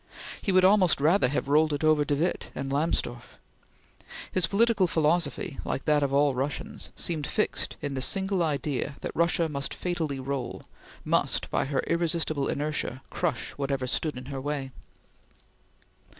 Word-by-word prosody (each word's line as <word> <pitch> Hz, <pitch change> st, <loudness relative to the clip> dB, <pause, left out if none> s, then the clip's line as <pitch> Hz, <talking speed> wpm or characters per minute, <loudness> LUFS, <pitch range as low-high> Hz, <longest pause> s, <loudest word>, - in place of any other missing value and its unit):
He 195 Hz, -, 0 dB
would 185 Hz, 0 st, +5 dB
almost 190 Hz, -5 st, +5 dB
rather 160 Hz, +6 st, +4 dB
have 135 Hz, +1 st, -1 dB
rolled 155 Hz, +2 st, +4 dB
it 145 Hz, -, -2 dB
over 155 Hz, -1 st, +4 dB
de 145 Hz, 0 st, 0 dB
Witte 165 Hz, +5 st, -1 dB
and 135 Hz, 0 st, -4 dB
Lamsdorf. 140 Hz, -5 st, -2 dB, 0.9 s
His 180 Hz, -2 st, +2 dB
political 210 Hz, -2 st, +3 dB
philosophy, 155 Hz, -4 st, 0 dB
like 135 Hz, -, -3 dB
that 150 Hz, -1 st, +3 dB
of 140 Hz, -1 st, +1 dB
all 140 Hz, 0 st, +3 dB
Russians, 135 Hz, +3 st, -4 dB
seemed 155 Hz, -4 st, -2 dB
fixed 215 Hz, -, -1 dB
in 145 Hz, -1 st, -2 dB
the 130 Hz, -, -2 dB
single 190 Hz, +4 st, +2 dB
idea 145 Hz, -2 st, -1 dB
that -, -, -5 dB
Russia 170 Hz, 0 st, +2 dB
must 140 Hz, -2 st, -3 dB
fatally 160 Hz, -6 st, -2 dB
roll 130 Hz, -1 st, -4 dB, 0.4 s
must, -, -, +1 dB
by -, -, +1 dB
her 135 Hz, 0 st, 0 dB
irresistible 165 Hz, -4 st, 0 dB
inertia, 145 Hz, -3 st, -2 dB
crush -, -, -2 dB
whatever 135 Hz, -2 st, -1 dB
stood 150 Hz, +2 st, -2 dB
in 130 Hz, -, -7 dB
her 135 Hz, -1 st, -5 dB
way. 140 Hz, -1 st, -3 dB
150 Hz, 155 wpm, -27 LUFS, 140-170 Hz, 0.9 s, would